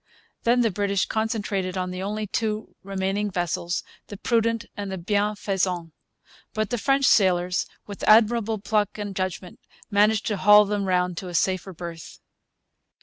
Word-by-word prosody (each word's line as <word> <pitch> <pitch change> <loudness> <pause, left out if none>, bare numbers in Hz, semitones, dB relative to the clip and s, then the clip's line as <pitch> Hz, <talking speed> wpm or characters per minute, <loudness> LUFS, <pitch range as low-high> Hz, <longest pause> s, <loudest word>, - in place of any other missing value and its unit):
Then 240 +1 +4
the 225 -2 +2
British 200 0 0
concentrated 205 -4 -2
on 180 0 -2
the 185 0 -5
only 210 +2 -3
two 215 +1 -3
remaining 195 +1 -2
vessels, 175 -1 -2 0.2
the 205 - -8
Prudent 230 +1 0
and 200 -1 -5
the 190 - -3
Bienfaisant. 195 -3 -1 0.6
But 215 -2 -1
the 240 - -1
French 275 +3 +2
sailors, 180 -5 +3 0.2
with 200 -1 -9
admirable 225 0 +4
pluck 210 0 -1
and 205 -2 -5
judgment, 185 -1 -4 0.3
managed 210 +1 +3
to 210 - -1
haul 210 +2 +7
them 205 0 -1
round 180 -1 0
to 185 - -5
a 175 - -6
safer 190 +2 0
berth. 170 -2 -8
200 Hz, 150 wpm, -24 LUFS, 185-215 Hz, 0.6 s, haul